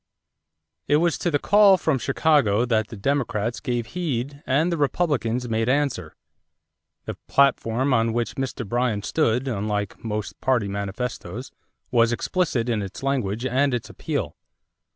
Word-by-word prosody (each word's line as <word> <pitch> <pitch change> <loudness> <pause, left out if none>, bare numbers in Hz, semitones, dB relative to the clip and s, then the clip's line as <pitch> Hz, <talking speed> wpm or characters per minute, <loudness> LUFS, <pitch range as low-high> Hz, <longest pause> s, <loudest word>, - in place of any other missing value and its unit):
= 75 +1 -57
It 145 - +4
was 170 +1 +2
to 175 - 0
the 145 - +2
call 200 +3 +5
from 155 -6 0
Chicago 125 -8 +2
that 110 -3 +1
the 110 - -9
Democrats 115 -2 -1
gave 120 -2 -2
heed 140 -2 -3
and 150 +7 +2
the 170 - 0
Republicans 135 -6 0
made 115 +1 0
answer. 130 - 0 0.9
The - - -5
platform 130 -1 +2
on 115 -1 +2
which 120 +1 -1
Mr. 130 -4 -4
Bryan 120 -2 0
stood, 125 -1 +1
unlike 105 -3 -3
most 105 -2 -4
party 125 -6 +1
manifestoes, 100 +3 -5 0.4
was 120 -2 +4
explicit 125 -2 0
in 115 -3 0
its 100 +5 -7
language 125 -4 -1
and 130 +1 +2
its 120 - -5
appeal. - - -3
125 Hz, 150 wpm, -24 LUFS, 110-140 Hz, 0.9 s, call